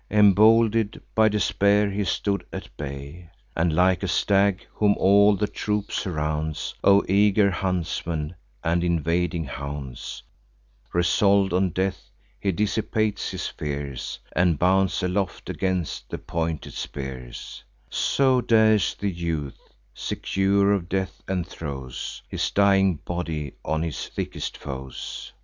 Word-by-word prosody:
Embolden'd 110 Hz, +1 st, +5 dB
by 110 Hz, 0 st, +5 dB
despair, 105 Hz, -1 st, +2 dB
he 100 Hz, +1 st, -1 dB
stood 100 Hz, +1 st, -1 dB
at -, -, -8 dB
bay; 70 Hz, +4 st, -7 dB, 0.3 s
And, 85 Hz, 0 st, +2 dB
like 90 Hz, +2 st, +3 dB
a -, -, -1 dB
stag, 100 Hz, -1 st, +2 dB
whom 105 Hz, -1 st, +3 dB
all 100 Hz, +2 st, +5 dB
the 105 Hz, -, 0 dB
troop 105 Hz, -1 st, -2 dB
surrounds 75 Hz, -4 st, -2 dB
Of 100 Hz, 0 st, +5 dB
eager 100 Hz, +1 st, +4 dB
huntsmen 85 Hz, -3 st, -2 dB, 0.3 s
and 85 Hz, +1 st, +1 dB
invading 85 Hz, 0 st, 0 dB
hounds 70 Hz, -1 st, -6 dB, 0.7 s
Resolv'd 95 Hz, +2 st, +3 dB
on 95 Hz, +1 st, +2 dB
death, 95 Hz, +2 st, -2 dB, 0.3 s
he 100 Hz, -, 0 dB
dissipates 105 Hz, +2 st, 0 dB
his -, -, -4 dB
fears, 70 Hz, -3 st, -4 dB, 0.2 s
And 85 Hz, -2 st, +3 dB
bounds 95 Hz, +3 st, +2 dB
aloft 90 Hz, +1 st, -2 dB
against 95 Hz, -4 st, -2 dB
the -, -, -4 dB
pointed 80 Hz, -2 st, -3 dB
spears: 65 Hz, -3 st, -7 dB, 0.2 s
So 130 Hz, -, +2 dB
dares 110 Hz, -3 st, +4 dB
the 100 Hz, -1 st, -2 dB
youth, 85 Hz, -5 st, -3 dB, 0.3 s
secure 100 Hz, +6 st, +1 dB
of 90 Hz, -3 st, -2 dB
death; 95 Hz, 0 st, -2 dB
and 90 Hz, -3 st, -1 dB
throws 65 Hz, -5 st, -6 dB
His -, -, -1 dB
dying 95 Hz, -2 st, +4 dB
body 80 Hz, -3 st, -4 dB
on 80 Hz, +1 st, -1 dB
his 80 Hz, -3 st, -4 dB
thickest -, -, -5 dB
foes. 65 Hz, -2 st, -7 dB
90 Hz, 125 wpm, -25 LUFS, 80-100 Hz, 0.7 s, Embolden'd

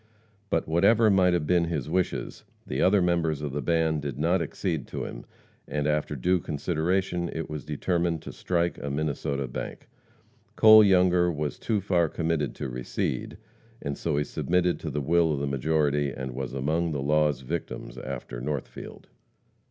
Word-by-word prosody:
But 80 Hz, -, 0 dB
whatever 105 Hz, +7 st, +4 dB
might 90 Hz, -2 st, +4 dB
have 85 Hz, -4 st, 0 dB
been 85 Hz, +1 st, +3 dB
his 75 Hz, -5 st, -3 dB
wishes, 90 Hz, +3 st, -2 dB, 0.2 s
the 65 Hz, -, -2 dB
other 95 Hz, 0 st, +4 dB
members 85 Hz, -4 st, +1 dB
of 75 Hz, -, -3 dB
the 75 Hz, +2 st, -3 dB
band 80 Hz, +2 st, +1 dB
did 70 Hz, -3 st, -5 dB
not 85 Hz, +5 st, +2 dB
accede 80 Hz, -2 st, -3 dB
to -, -, -5 dB
them, -, -, -7 dB, 0.4 s
and, 75 Hz, -1 st, -2 dB
after 75 Hz, 0 st, 0 dB
due 90 Hz, +8 st, +2 dB
consideration, 85 Hz, +3 st, -1 dB
it 80 Hz, -1 st, -5 dB
was 75 Hz, -2 st, -5 dB
determined 85 Hz, +2 st, -1 dB
to -, -, -7 dB
strike 85 Hz, -1 st, -1 dB
a 70 Hz, -, -4 dB
Minnesota 70 Hz, -2 st, -2 dB
bank. -, -, -7 dB, 0.7 s
Cole 110 Hz, 0 st, +9 dB
Younger 90 Hz, -2 st, +4 dB
was 75 Hz, -2 st, -3 dB
too 110 Hz, -3 st, 0 dB
far 90 Hz, -4 st, +2 dB
committed 80 Hz, -5 st, -1 dB
to -, -, -4 dB
recede, 60 Hz, -1 st, -3 dB, 0.4 s
and 70 Hz, 0 st, -4 dB
so 75 Hz, -4 st, -1 dB
he 75 Hz, -, +2 dB
submitted 90 Hz, +3 st, 0 dB
to -, -, -4 dB
the 75 Hz, -, -2 dB
will 80 Hz, +2 st, +3 dB
of 70 Hz, -, -2 dB
the 70 Hz, -, -1 dB
majority, 70 Hz, +1 st, +1 dB
and 65 Hz, 0 st, -5 dB
was 65 Hz, +1 st, -5 dB
among 80 Hz, +5 st, 0 dB
the 70 Hz, -, -2 dB
law's 75 Hz, -2 st, +2 dB
victims 60 Hz, -1 st, -5 dB
after -, -, -6 dB
Northfield. 70 Hz, 0 st, -6 dB
80 Hz, 170 wpm, -27 LUFS, 70-85 Hz, 0.7 s, Cole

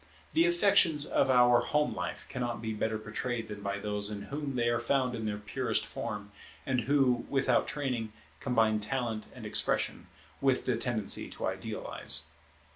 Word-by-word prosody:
The 330 Hz, +2 st, +4 dB
affections 185 Hz, -, +4 dB
of 135 Hz, -, +2 dB
our 125 Hz, -1 st, +6 dB
home 150 Hz, 0 st, +1 dB
life -, -, -4 dB
cannot 120 Hz, -3 st, -3 dB
be 110 Hz, 0 st, -3 dB
better 110 Hz, +1 st, -1 dB
portrayed 115 Hz, +2 st, -3 dB
than 105 Hz, -1 st, -7 dB
by 100 Hz, 0 st, -2 dB
those 105 Hz, 0 st, -2 dB
in 105 Hz, -1 st, -5 dB
whom 145 Hz, -2 st, -3 dB
they 120 Hz, -1 st, +1 dB
are 120 Hz, 0 st, +2 dB
found 125 Hz, +1 st, +1 dB
in 110 Hz, -2 st, -3 dB
their 105 Hz, -1 st, -2 dB
purest 105 Hz, 0 st, -1 dB
form, 105 Hz, -1 st, -5 dB, 0.3 s
and 130 Hz, -2 st, +1 dB
who, 135 Hz, 0 st, +2 dB
without 135 Hz, -1 st, +2 dB
training, 125 Hz, -6 st, -2 dB, 0.3 s
combine 110 Hz, -3 st, +2 dB
talent 110 Hz, -1 st, -2 dB
and -, -, -9 dB
expression -, -, +1 dB, 0.3 s
with 135 Hz, -1 st, +2 dB
the 125 Hz, -, +2 dB
tendency 115 Hz, -3 st, 0 dB
to -, -, -4 dB
idealize. -, -, -1 dB
120 Hz, 165 wpm, -31 LUFS, 110-135 Hz, 0.3 s, our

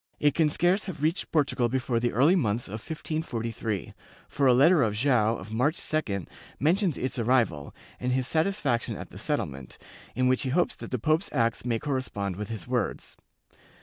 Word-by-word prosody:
It 145 Hz, -1 st, +3 dB
can 160 Hz, -2 st, +3 dB
scarce 175 Hz, +6 st, +2 dB
have 165 Hz, -7 st, -6 dB
reached 160 Hz, +4 st, 0 dB
Portugal 140 Hz, -6 st, +1 dB
before 125 Hz, -1 st, 0 dB
the 120 Hz, +1 st, 0 dB
early 145 Hz, -, +4 dB
months 120 Hz, -, 0 dB
of 105 Hz, +3 st, -6 dB
1543 115 Hz, -, -4 dB, 0.3 s
for 140 Hz, -1 st, +1 dB
a 125 Hz, -, +6 dB
letter 155 Hz, +5 st, +6 dB
of 110 Hz, -4 st, +1 dB
Joao 115 Hz, -2 st, +2 dB
of 110 Hz, -, -9 dB
March 145 Hz, +8 st, +1 dB
2d 100 Hz, -, -2 dB, 0.3 s
mentions 175 Hz, +2 st, +2 dB
its 130 Hz, -1 st, -3 dB
arrival 115 Hz, -, +1 dB, 0.2 s
and 125 Hz, -, -1 dB
his 130 Hz, 0 st, +1 dB
satisfaction 155 Hz, -, 0 dB
at -, -, -9 dB
the -, -, -10 dB
settlement, 65 Hz, -2 st, -3 dB, 0.4 s
in 130 Hz, +1 st, +2 dB
which 130 Hz, 0 st, +2 dB
he 130 Hz, -, -2 dB
hopes 175 Hz, +7 st, +1 dB
that -, -, -8 dB
the 125 Hz, -, -1 dB
pope's 155 Hz, -, +1 dB
acts 115 Hz, -3 st, 0 dB
may 120 Hz, -2 st, +1 dB
correspond 115 Hz, -8 st, -3 dB
with 105 Hz, +1 st, -5 dB
his 110 Hz, 0 st, -6 dB
words. 125 Hz, -5 st, -2 dB
130 Hz, 180 wpm, -27 LUFS, 115-155 Hz, 0.4 s, a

